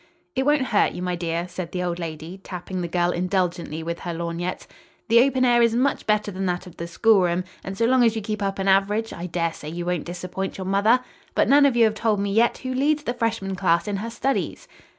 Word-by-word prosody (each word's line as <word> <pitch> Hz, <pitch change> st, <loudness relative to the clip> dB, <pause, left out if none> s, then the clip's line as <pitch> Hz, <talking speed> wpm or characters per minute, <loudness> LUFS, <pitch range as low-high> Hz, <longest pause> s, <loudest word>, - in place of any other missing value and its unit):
"It 265 Hz, +1 st, 0 dB
won't 295 Hz, -2 st, +4 dB
hurt 210 Hz, -, +3 dB
you, 180 Hz, -, -5 dB
my 180 Hz, -1 st, -1 dB
dear," 170 Hz, 0 st, -2 dB
said 175 Hz, -1 st, -6 dB
the 180 Hz, -1 st, -2 dB
old 175 Hz, -1 st, -2 dB
lady, 165 Hz, +2 st, -6 dB
tapping 180 Hz, 0 st, -5 dB
the 175 Hz, -, -2 dB
girl 175 Hz, +1 st, +1 dB
indulgently 175 Hz, -3 st, -1 dB
with 170 Hz, +1 st, -4 dB
her 175 Hz, -1 st, -5 dB
lorgnette; 170 Hz, +2 st, -4 dB, 0.4 s
"the 235 Hz, +1 st, +7 dB
open 260 Hz, 0 st, +2 dB
air 240 Hz, -1 st, +4 dB
is 230 Hz, -1 st, +3 dB
much 260 Hz, +3 st, 0 dB
better 210 Hz, -1 st, +1 dB
than 190 Hz, 0 st, -3 dB
that 180 Hz, +1 st, -2 dB
of 180 Hz, -, -13 dB
the 170 Hz, -, -5 dB
schoolroom, 180 Hz, -2 st, +3 dB, 0.2 s
and 195 Hz, 0 st, -6 dB
so 230 Hz, -, +2 dB
long 255 Hz, +1 st, +4 dB
as 230 Hz, -1 st, +3 dB
you 220 Hz, -, -2 dB
keep 215 Hz, 0 st, -3 dB
up 195 Hz, -1 st, -1 dB
an 195 Hz, 0 st, -2 dB
average, 205 Hz, +3 st, +2 dB
I 175 Hz, +1 st, -5 dB
daresay 165 Hz, -3 st, -3 dB
you 170 Hz, +2 st, -5 dB
won't 180 Hz, -2 st, -1 dB
disappoint 185 Hz, +2 st, -5 dB
your 190 Hz, -, -5 dB
mother. 205 Hz, +6 st, +3 dB, 0.3 s
But -, -, +3 dB
none 285 Hz, 0 st, +7 dB
of 265 Hz, -, 0 dB
you 235 Hz, -, +5 dB
have 220 Hz, -1 st, +4 dB
told 215 Hz, -1 st, 0 dB
me 200 Hz, 0 st, -1 dB
yet 230 Hz, +3 st, +3 dB
who 255 Hz, 0 st, -4 dB
leads 295 Hz, +3 st, +1 dB
the 240 Hz, -, -2 dB
freshman 225 Hz, -5 st, -2 dB
class 180 Hz, 0 st, +1 dB
in 205 Hz, -1 st, -1 dB
her 220 Hz, +4 st, -4 dB
studies." 270 Hz, +4 st, -2 dB
195 Hz, 240 wpm, -24 LUFS, 175-230 Hz, 0.4 s, the